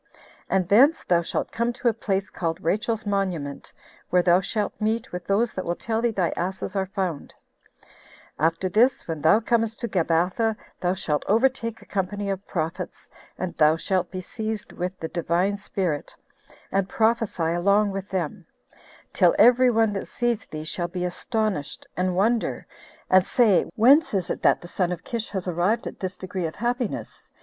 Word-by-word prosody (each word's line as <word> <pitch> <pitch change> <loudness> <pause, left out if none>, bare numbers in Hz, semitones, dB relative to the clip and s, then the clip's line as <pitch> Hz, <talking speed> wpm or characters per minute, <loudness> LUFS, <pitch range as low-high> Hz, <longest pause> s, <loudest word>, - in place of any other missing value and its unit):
And 190 -2 +1
thence 270 - +5
thou 175 -1 +3
shalt 170 - -3
come 235 +1 0
to 245 - -2
a 235 - +4
place 195 -3 -2
called 165 -1 -2
Rachel's 220 +1 0
Monument, 185 -8 -2 0.4
where 180 0 +3
thou 175 +1 +5
shalt 210 +2 -3
meet 220 +2 -1
with 180 0 -6
those 215 +4 +1
that 185 - -3
will 175 - -2
tell 225 +3 -2
thee 240 - +2
thy 190 -6 0
asses 190 +3 -3
are 190 -1 0
found; 185 -6 -4 1.0
after 165 +4 +1
this, 235 +7 +2
when 160 -3 -4
thou 160 +8 +5
comest 225 0 0
to 235 - -1
Gabatha, 185 +4 +1 0.2
thou 180 +1 0
shalt 150 -5 -1
overtake 230 0 +1
a - - -18
company 200 +1 -2
of 195 +1 -5
prophets, 165 +1 -4 0.3
and 185 -1 -3
thou 155 0 +5
shalt 180 +1 -1
be 185 -1 -5
seized 220 +2 -5
with 180 +1 -4
the 160 - -3
Divine 175 +4 0
Spirit, 185 -6 -3 0.3
8 - - -21 0.2
and 195 -1 0
prophesy 220 -7 +1
along 200 +4 +3
with 195 0 -5
them, 185 -1 -3 0.7
till - - +4
every 250 +1 +6
one 225 -2 +2
that 195 - -4
sees 240 -3 -1
thee 155 0 -6
shall 170 +2 -3
be 180 0 -3
astonished, 210 - -2
and 180 0 0
wonder, 220 +5 +1 0.4
and 185 0 +5
say, 215 -3 +3
Whence 265 +4 +5
is 185 -3 -1
it - - -4
that - - +3
the 175 - -9
son 180 0 -1
of 180 0 -5
Kish 230 -2 -4
has 190 -2 -4
arrived 180 +6 +1
at - - -7
this 185 0 -4
degree 185 -2 -3
of 160 - -8
happiness? 240 0 -3
195 Hz, 180 wpm, -25 LUFS, 175-220 Hz, 1.0 s, every